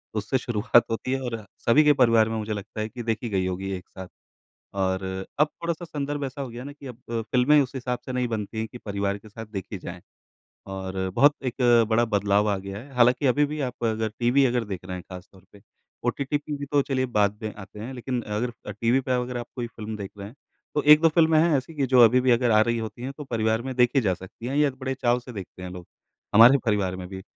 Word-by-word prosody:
उससे 110 +5 0
शुरुआत 120 -1 +3
होती 115 +3 -2
है 135 - 0
और 115 -4 -5 0.2
सभी 145 +7 +6
के 150 0 +6
परिवार 115 -4 +4
में 110 - -2
मुझे 110 0 -3
लगता 105 +1 -7
है 110 - -3
कि 120 +1 -7
देखी 115 +1 -2
गई 95 -3 0
होगी 95 +1 -3
एक 90 -1 -7
साथ, 95 -1 -9 0.7
और 95 -1 0 0.4
अब 150 - +6 0.2
थोड़ा-सा 170 0 -2
संदर्भ 145 -2 -3
ऐसा 135 +1 -5
हो 135 - -5
गया 120 +1 -8
ना 145 - -7
कि 145 -1 -13
अब 125 -1 -10
अ, 115 -1 -1
फ़िल्में 125 +6 +4
उस 135 -2 -2
हिसाब 125 -1 -3
से 130 - -4
नहीं 125 -1 0
बनती 110 -1 -4
हैं 110 - -1
कि 120 - -10
परिवार 100 -2 -2
के 110 - -15
साथ 110 +2 -9
देखी 100 -1 -6
जाएँ 90 0 -8 0.7
और 95 0 -3
बहुत 145 +6 +5
एक 125 - -2 0.3
बड़ा 115 +1 +3
बदलाव 105 -1 +1
आ 100 - +1
गया 100 +1 -7
है। 135 +5 -12
हालाँकि 125 +3 +4
अभी 145 +4 +3
भी 150 +1 -5
आप 125 -1 -8
अगर 110 -1 0
टीवी 125 +3 +4
देख 100 -5 -5
रहे 90 0 -5
हैं 90 - -7
खासतौर 95 +1 -11
पे, 100 - -16 0.4
ओटीटी 140 +4 0
पे 145 0 -5
भी 145 - -5
तो 145 - +5
चलिए 130 -1 -1
बाद 105 -3 +1
में 110 -1 -4
आते 105 0 -11
हैं, 120 +5 -6
लेकिन 125 0 -3
अगर 110 +3 -3
अ, - - -4
टीवी 115 +5 +1
पे 130 0 -2
अगर 125 0 -5
आप 120 - -6
कोई 120 -2 -2
फ़िल्म 110 -2 -7
देख 100 -2 -6
रहे 100 - -6
हैं, 115 - -15 0.4
तो 150 - +1
1-2 150 +2 +7
फ़िल्में 160 -1 +4
हैं 165 -2 +3
ऐसी 135 +5 -8
कि 140 -3 0
जो 130 -1 +5
अभी 125 +3 +5
भी 130 0 +2
अगर 120 0 +2
आ 110 -1 +5
रही 115 +1 0
होती 115 +2 -6
हैं 135 +2 -4
तो 150 - -6
परिवार 110 -2 0
में 130 +1 -5
देखी 125 +2 +4
जा 95 -6 +1
सकती 95 +6 -10
हैं, 135 +3 -2
या 145 -1 +4
बड़े 130 0 -4
चाव 120 -2 +1
से 125 +1 -11
देखते 95 -3 -9
हैं 90 - -6
लोग, 90 -1 -9 0.5
हमारे 115 +4 +9
जो - - +4
परिवार 100 -4 +1
में 90 -1 -7
भी। 95 0 -8
115 Hz, 250 wpm, -25 LUFS, 105-130 Hz, 0.7 s, हमारे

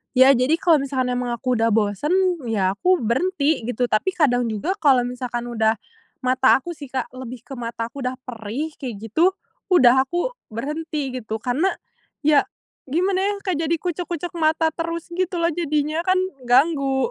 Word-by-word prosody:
Ya, 260 +1 +8
jadi, 260 +4 +3
kalau 330 -2 +3
misalkan 260 -2 -1
emang 245 -1 -1
aku 255 +2 -2
udah 225 - +3
bosen, 210 - 0 0.4
ya 195 -4 +1
aku 355 - +1
berhenti, 285 - 0
gitu. 245 0 -1
Tapi 360 - +1
kadang 245 -6 +2
juga, 220 - -2
kalau 270 -7 +4
misalkan 245 -1 -4
udah 220 -1 +2 0.5
mata 255 +1 +4
aku 345 - -5
sih, 300 -4 -9
Kak. 260 -1 -4
Lebih 255 -2 -8
ke 275 - -10
mata 230 -1 -4
aku 280 - -9
udah 255 0 -2
perih, 245 +5 -5
kayak 250 -5 -5 0.2
gitu, 355 - +3 0.3
udah. 260 -8 +6
Aku 350 - -1 0.2
berhenti, 295 +4 -4
gitu. 220 -2 -5
Karena 265 +9 +1 0.6
ya, 295 -1 +5 0.5
gimana 370 +6 +1
ya, 405 +1 +1
Kak, 370 -3 0
jadi 325 +1 +1
kucek-kucek 350 0 -4
mata 320 0 +2
terus 335 0 -4
gitu 365 0 -1
loh, 335 - +2
jadinya. 305 -1 0
Kan, 370 +1 +2 0.3
ganggu. 270 0 +3
275 Hz, 170 wpm, -22 LUFS, 245-330 Hz, 0.6 s, Ya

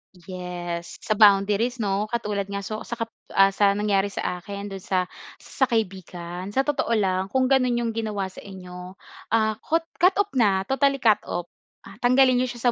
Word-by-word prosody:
Yes, 175 -1 -6
sa 225 - +1
boundaries, 210 +3 +4
'no. 200 +1 0
Katulad 210 -3 -2
nga, 200 0 -4
so, 215 +2 -4
sa 235 - -3
kap 230 -1 -4 0.2
ah, 195 0 +6
sa 200 0 +3
nangyari 205 -1 +1
sa 180 -2 -3
akin 200 +2 -7
doon 195 - -6
sa, 185 -1 0 0.3
sa 265 - -1
kaibigan. 185 -5 -3
Sa 270 - +3
totoo 270 -5 0
lang, 190 -2 0
kung 260 +4 +1
gano'n 255 -2 +3
'yong 230 - -1
ginawa 210 -4 -3
sa - - -12
inyo, 180 -1 -10 0.4
ah, 220 -1 +1
kot 330 +1 0 0.2
cut 365 +2 +5
off 405 0 0
na, 200 -6 +2
totally 275 +4 +2
cut 220 -5 +3
off, 175 0 -4 0.3
ah, 195 +2 -14
tanggalin 255 +1 +4
niyo 255 - +1
siya 240 0 0
205 Hz, 185 wpm, -24 LUFS, 190-240 Hz, 0.4 s, ah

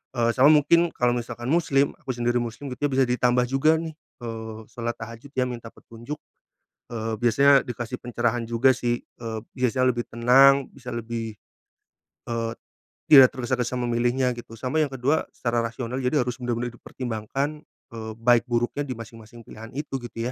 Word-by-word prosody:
Eee, 115 -1 +2
sama 130 +4 +5
mungkin 165 +3 +4
kalau 125 0 +2
misalkan 120 +1 -3
muslim- 145 -4 +2
aku 130 - -5
sendiri 120 0 +1
muslim 120 +3 -5
gitu 145 +3 -1
ya- - - -6
bisa 135 0 +4
ditambah 125 0 +2
juga 145 +4 +3
nih, 160 -1 -6 0.3
eee, 110 -1 -6
solat 120 0 -3
tahajud 115 +4 -9
ya, 130 -1 +1
minta 115 -2 -7
petunjuk. 120 +6 -9 0.8
Eee, 110 -1 -3
biasanya 135 +5 +4
dikasih 120 0 -5
pencerahan 120 -1 -1
juga 120 +3 +3
sih, 120 -1 -1
eee, 115 -2 -7 0.2
biasanya 130 0 +2
lebih 120 0 -3
tenang, 135 +3 +5
bisa 125 -2 -10
lebih 115 -1 -4 1.0
eee, 115 -1 -2 0.6
tidak 135 -3 +11
tergesa-gesa 125 0 -1
memilihnya 120 +1 +1
gitu, 120 -1 -9
sama 130 +7 -1
yang 155 - +3
kedua 135 +4 0
secara 120 -1 -1
rasional 115 +2 -3
jadi 130 +1 +1
harus 125 +1 -5
benar-benar 120 -1 -2
dipertimbangkan, 125 +5 -4 0.3
eee, 110 -1 -6
baik 120 +1 +3
buruknya 120 +4 -1
di 130 - -4
masing-masing 115 0 -11
pilihan 110 +1 -11
itu, 140 -2 -3
gitu 120 0 -5
120 Hz, 160 wpm, -25 LUFS, 115-130 Hz, 1.0 s, tidak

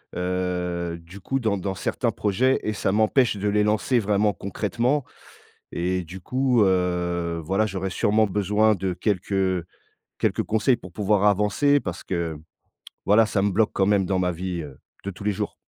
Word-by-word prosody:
Heu, 90 -1 -2
du 90 +4 -12
coup 135 +8 -2
dans 110 -4 0
dans 95 +1 -3
certains - - -1
projets 125 +6 +1
et 110 - -1
ça 100 -1 -1
m'empêche 110 +2 +3
de 100 +1 -1
les 105 +1 +2
lancer 110 +4 +2
vraiment 105 0 +2
concrètement 120 +8 -1 0.7
et 90 +1 -1
du 90 +3 -10
coup, 125 0 +2
heu, 90 -2 0
voilà 95 +5 +1
j'aurais 95 -1 -3
sûrement 110 +3 +2
besoin 105 +2 +2
de 95 0 -2
quelques, 95 +1 -2
heu 95 -3 +1 0.5
quelques - - +1
conseils 110 +4 +2
pour 90 - -12
pouvoir 105 +2 +1
avancer. 105 +8 +3
Parce 85 -8 -6
que 85 -4 -3 0.7
voilà 105 +3 +5
ça 105 -2 0
me 100 - +2
bloque 105 +3 +2
quand 95 - +1
même 100 -2 +2
dans 95 0 0
ma 90 -1 +1
vie, 90 0 -4
heu, 70 -3 -10 0.3
de 100 - -3
tous 100 +1 -10
les 105 - +1
jours. - - -3
100 Hz, 180 wpm, -24 LUFS, 90-105 Hz, 0.7 s, voilà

